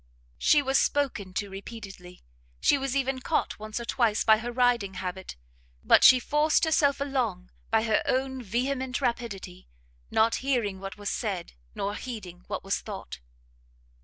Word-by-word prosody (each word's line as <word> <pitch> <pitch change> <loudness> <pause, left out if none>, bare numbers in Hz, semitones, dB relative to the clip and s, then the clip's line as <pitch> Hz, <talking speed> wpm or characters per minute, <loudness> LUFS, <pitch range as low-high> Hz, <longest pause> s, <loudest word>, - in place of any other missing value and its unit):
She 295 -1 +4
was 270 0 +3
spoken 260 -10 0
to 205 -1 -2
repeatedly; 195 -3 -10 0.4
she - - +4
was 270 -1 -2
even 270 -1 0
caught - - -1
once 215 +2 -5
or 235 - -6
twice 230 -4 +1
by 220 -1 +5
her 240 +2 -4
riding 240 -6 +1
habit; 185 0 -5 0.5
but - - +5
she 255 - +9
forced 300 +6 +2
herself 295 -3 +2
along 245 -10 -2 0.2
by 220 -1 +2
her 220 -2 +2
own 265 0 0
vehement 255 +4 -2
rapidity, 230 - -4 0.4
not 225 +1 +3
hearing 240 -8 -1
what 195 +1 -7
was 205 -1 -3
said, 195 -7 -3 0.2
nor 200 +1 -2
heeding 205 -7 -8
what - - -4
was 195 0 -1
thought. 195 - -8
230 Hz, 155 wpm, -27 LUFS, 195-265 Hz, 0.5 s, she